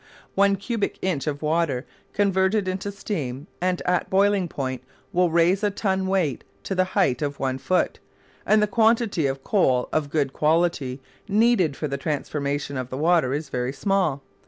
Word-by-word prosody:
One 200 0 +4
cubic 205 +2 -2
inch 170 -6 -1
of 145 0 -3
water 155 -5 0 0.3
converted 195 0 +1
into 190 +2 -3
steam 150 - -4 0.2
and 180 0 0
at 180 -1 0
boiling 195 -1 +3
point 130 -4 -4 0.3
will 180 0 +3
raise 170 +4 +3
a 205 - +3
ton 190 -2 -1
weight 180 -9 0 0.2
to - - -3
the 185 0 +3
height 130 -10 +2
of 145 -1 -3
one 130 -1 -1
foot; 180 +8 0 0.4
and 215 0 +4
the - - +5
quantity 220 - +2
of 135 0 -4
coal 130 -12 +2
of 150 -2 0
good 140 -3 0
quality 150 -5 +1 0.3
needed 205 - +3
for 155 - -2
the 140 0 -4
transformation 145 -1 -2
of 130 -1 -4
the 130 - -5
water 160 -3 +3
is 150 +1 -3
very 125 0 -2
small. 180 -6 0
170 Hz, 170 wpm, -24 LUFS, 140-195 Hz, 0.4 s, the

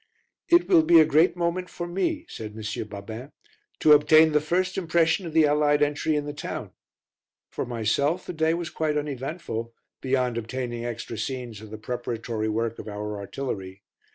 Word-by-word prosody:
"It 345 0 +5
will 350 -4 +6
be 170 - +6
a 155 - +7
great 155 +4 +4
moment 175 +1 -1
for 175 - -5
me," 295 - -2
said 110 -1 -8
M. 110 0 -4
Babin, 110 +6 -8 0.5
"to 150 - +7
obtain 155 +2 +6
the 150 0 +3
first 180 +5 0
impression 170 +1 +1
of 160 - -7
the 160 -1 +5
Allied 145 0 +3
entry 150 +2 0
in 145 -1 -1
the 145 - -5
town." - - -6 0.8
For - - -4
myself 125 +9 0
the - - -5
day 160 0 +1
was 170 -1 -4
quite 155 -1 -1
uneventful, 135 -5 -4 0.3
beyond 130 -3 0
obtaining 120 0 -4
extra 115 -1 -5
scenes 125 -5 -4
of 110 - -11
the 110 - -7
preparatory 115 -1 -3
work 115 +1 -2
of - - -8
our 105 0 -5
artillery. 100 -3 -5
145 Hz, 175 wpm, -26 LUFS, 115-160 Hz, 0.8 s, a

